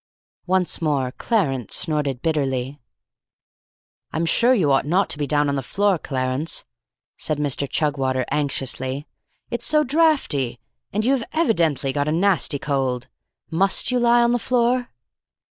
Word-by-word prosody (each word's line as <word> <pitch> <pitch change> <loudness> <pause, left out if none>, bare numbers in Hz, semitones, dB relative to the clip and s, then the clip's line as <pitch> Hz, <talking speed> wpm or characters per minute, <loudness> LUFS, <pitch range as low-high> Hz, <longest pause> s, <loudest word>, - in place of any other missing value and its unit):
Once 185 -1 +1
more 140 -5 0
Clarence 135 - -1
snorted 145 -6 -1
bitterly. 135 -4 -1 1.3
"I'm 160 +1 -1
sure 235 +8 +4
you 160 - +2
ought 135 +1 +2
not 185 +6 +1
to - - -2
be 145 - -1
down 145 +1 +2
on 140 - 0
the 135 - -1
floor, 195 +6 +1
Clarence," 130 +3 -2 0.5
said 155 - -2
Mr. 140 -1 -1
Chugwater 135 -4 0
anxiously. 135 -1 -2 0.5
"It - - -2
is - - +1
so 305 0 +4
draughty, 275 - +1 0.3
and 215 +1 -1
you 260 - +3
have 260 -4 0
evidently 165 - +1
got 145 +1 -1
a - - +1
nasty 170 -3 +2
cold. 130 -3 -2 0.4
Must 190 +8 +2
you 250 - +2
lie 240 0 +4
on 235 - +3
the 245 - +1
floor?" 245 +1 +1
150 Hz, 150 wpm, -22 LUFS, 135-205 Hz, 1.3 s, sure